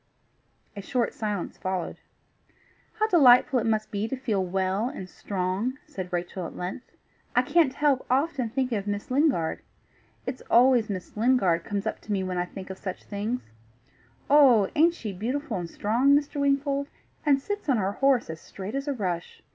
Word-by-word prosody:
A 200 - -5
short 240 +4 -1
silence 210 -4 -4
followed. 185 -2 -3 1.0
"How 435 - +1
delightful 260 - +6
it 230 - -2
must 215 -1 0
be 210 +1 -1
to 265 - -3
feel 215 -7 -1
well 190 +5 0
and 225 -10 -7
strong!" 195 +7 -3
said 185 -12 -7
Rachel 175 +1 -3
at - - -11
length. 180 +7 -6 0.4
"I - - +5
can't 320 -6 +3
help 285 -2 +2
often 265 -2 +1
thinking 250 -2 -1
of 200 - -9
Miss 205 +3 -3
Lingard. 260 - +1 0.6
It's 255 0 -4
always 240 -2 +5
Miss 185 -3 -6
Lingard 210 -8 +2
comes 200 -1 -3
up - - -3
to 215 - -8
me 195 -2 0
when 185 -1 -2
I 175 - 0
think 190 +1 -9
of 190 - -9
such 185 -2 -6
things. 215 +5 -3 0.9
Oh! 265 -8 +6
ain't 335 +3 +4
she 215 -9 -5
beautiful 240 +4 -3
and 175 -2 -5
strong, 245 +10 +3
Mr. 290 0 -3
Wingfold? 280 0 +1 0.4
and 285 -3 +4
sits 410 +3 -5
on 260 - +4
her 195 -2 0
horse 270 +2 +2
as 160 0 -9
straight 195 +3 -8
as 275 +1 -3
a 285 - 0
rush! 180 -8 -4
225 Hz, 180 wpm, -26 LUFS, 190-275 Hz, 1.0 s, delightful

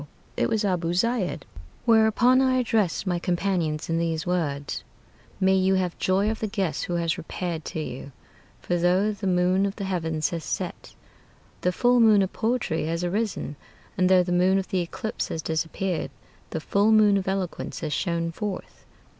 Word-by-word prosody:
it - - +1
was 220 -1 +1
Abu 175 -3 0
Zeid; 190 - 0 0.4
Whereupon 230 +3 +5
I 260 -1 +3
addressed 220 -8 +1
my 175 -2 0
companions 175 -4 -1
in 165 0 0
these 165 0 -1
words: 150 -6 -2 0.6
"May 190 0 +4
you 190 0 +3
have 180 -2 0
joy 195 +3 +2
of 220 - -4
the 220 - -1
guest 195 -8 -2
who 175 - -2
has 170 -1 0
repaired 165 -1 -4
to - - -4
you: 140 -2 -6 0.5
For 175 - -1
though 180 +4 +2
the 205 -1 -4
moon 180 +1 +2
of 200 0 -1
the 200 - -5
heavens 160 -5 -1
has 165 -2 -4
set, - - -5 0.7
The 180 - +2
full 245 +6 +3
moon 215 -3 +6
of 190 - -4
poetry 220 -9 -1
has 165 +2 -2
arisen; 190 -5 -2 0.4
And 185 -2 +2
though 185 -1 +6
the 180 - -4
moon 180 +2 +3
of 195 - -3
the 185 -3 0
eclipse 195 +5 -4
has 160 - -4
disappeared, 165 +3 -2 0.4
The 160 - -4
full 200 +6 +2
moon 215 -2 +5
of 195 -1 -1
eloquence 190 -2 -3
has 155 -2 -2
shone 170 -2 -1
forth." 205 +2 -6
185 Hz, 180 wpm, -25 LUFS, 170-205 Hz, 0.7 s, moon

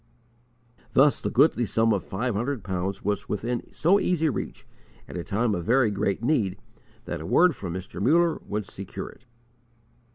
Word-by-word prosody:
Thus 140 +2 +5
the - - -1
goodly 125 -3 +3
sum 115 +1 +2
of 100 - -1
five 120 +5 -2
hundred 120 +2 -2
pounds 95 0 -3
was 105 0 -1
within 120 +4 -3
so 185 +6 +3
easy 160 -5 +1
reach, 135 - -5 0.4
at - - -9
a 90 - -3
time 110 +3 0
of 85 -3 -3
very 120 0 +3
great 100 +1 -1
need, 110 -9 +1 0.5
that 85 - -4
a - - -6
word 175 -3 +4
from 90 -7 -5
Mr. 95 +1 -6
Muller 165 +8 +3
would 105 0 -2
secure 95 0 -7
it. 120 - -18
110 Hz, 170 wpm, -26 LUFS, 100-135 Hz, 0.5 s, Thus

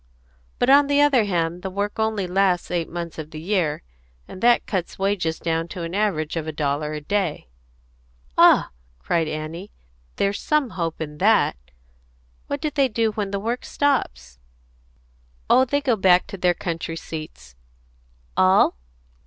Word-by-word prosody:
"But, - - +1
on 285 +1 +6
the 285 0 +2
other 280 -6 +4
hand, 175 -2 -1
the 190 - -4
work 205 +3 -3
only 220 -3 0
lasts 180 -1 +1
eight 170 -2 -1
months 170 -1 -6
of 155 -1 -6
the 155 - -8
year, 170 - -1 0.4
and 185 - -10
that 240 0 +4
cuts 185 -4 -3
wages 190 -5 -1
down 165 0 -2
to 175 0 -6
an 165 +1 -5
average 185 -7 -1
of 160 -1 -3
a - - -2
dollar 150 0 -2
a 150 - -5
day." 170 - -2 0.9
"Ah!" - - +5 0.3
cried 160 - -1
Annie. 155 +5 -6 0.4
"There's 200 0 -1
some 300 -6 +1
hope 165 -3 -3
in 150 -1 -6
that! 215 +3 +3 0.9
What 285 - -3
do 305 -2 -1
they 275 -2 +2
do 225 -2 0
when 210 -2 -3
the 200 0 -2
work 235 +4 -3
stops?" 65 - -1 1.1
"Oh, 260 - +6
they 285 +3 0
go 255 -5 +2
back 185 -3 +4
to 195 - -6
their 180 -1 +2
country 165 -1 -4
seats." 155 - -9 0.8
"All?" 185 - +4
185 Hz, 160 wpm, -23 LUFS, 160-215 Hz, 1.1 s, on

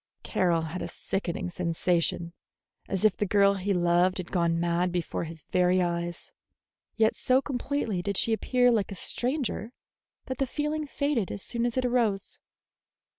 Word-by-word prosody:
Carroll 170 -3 +1
had 160 +3 -5
a - - -3
sickening 180 -2 -3
sensation, 170 -1 0 0.5
as 195 +1 0
if 215 - +5
the - - -1
girl 200 0 +5
he 195 +1 -2
loved 175 0 +3
had 185 -1 -6
gone 170 -2 +1
mad 175 +1 +1
before 175 -1 -2
his 160 -2 -9
very 180 0 +3
eyes; 170 -1 -2 0.6
yet 220 -1 +3
so 255 0 +3
completely 265 -7 -2
did 200 +1 -2
she 225 - +2
appear 245 +2 +3
like 215 -3 +1
a - - -5
stranger 245 0 -1 0.5
that 260 - -5
the 270 - +1
feeling 300 +2 -2
faded 280 -8 0
as 200 - -4
soon 235 0 -1
as 240 - -3
it 255 - +1
arose. 230 -6 0
195 Hz, 165 wpm, -28 LUFS, 175-245 Hz, 0.6 s, if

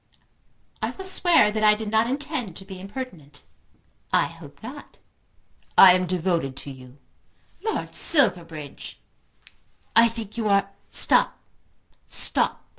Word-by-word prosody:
"I - - -1
will 385 - -8
swear 350 - +3
that 215 0 -3
I 210 0 +6
did 210 -1 -6
not 220 +1 +2
intend 270 - -4
to 195 - -10
be 190 -1 -10
impertinent." 195 - -9 0.7
"I - - +3
hope - - -13
not." - - -11 0.8
"I 185 -2 +9
am 185 0 0
devoted 170 -6 -2
to 140 - -8
you." 130 0 -14 0.7
"Lord 440 - -3
Silverbridge!" 165 - +1 1.0
"I 230 0 +7
think 225 -1 -9
you 220 -2 -1
are 200 0 +1
" - - -40
"Stop, - - +3 0.7
stop. - - 0
200 Hz, 130 wpm, -24 LUFS, 175-230 Hz, 1.0 s, I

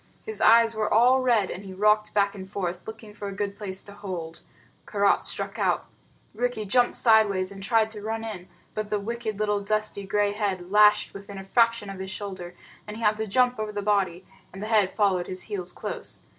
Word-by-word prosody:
His 440 0 -4
eyes 230 +1 +6
were 215 -1 -1
all 250 +4 +5
red, 235 -6 +2
and 190 - -7
he 190 -1 -9
rocked 210 +2 +2
back 200 -1 +3
and 190 -1 -9
forth, 180 -3 -4
looking 220 -1 -9
for 205 -1 -7
a - - -4
good 200 0 -3
place 195 -2 -7
to 200 - -12
hold. 175 -5 -7 0.5
Karait 200 -1 +2
struck - - -2
out. - - +1 0.5
Rikki 240 -1 -2
jumped 245 +5 +3
sideways 205 -5 +4
and 195 0 -10
tried 220 +1 +2
to 210 -2 -8
run 225 +1 -3
in, 200 -5 -6 0.3
but 215 -1 -4
the 210 0 0
wicked 220 0 -4
little 210 -1 0
dusty 215 -1 -1
gray 205 0 +1
head 195 -4 -3
lashed 210 0 +5
within 200 0 -9
a 195 - -7
fraction 230 +1 +2
of 195 - -9
his 190 0 -5
shoulder, 190 -3 -6 0.3
and 210 +1 -7
he 230 - -6
had 210 0 +3
to 220 0 -3
jump 250 +3 +2
over 215 0 -3
the 205 -1 -4
body, 190 -3 0 0.3
and 190 - -10
the 210 - -4
head 205 -4 +4
followed 190 -4 +1
his 185 0 -2
heels 185 -4 -4
close. - - -5
205 Hz, 210 wpm, -26 LUFS, 195-220 Hz, 0.5 s, eyes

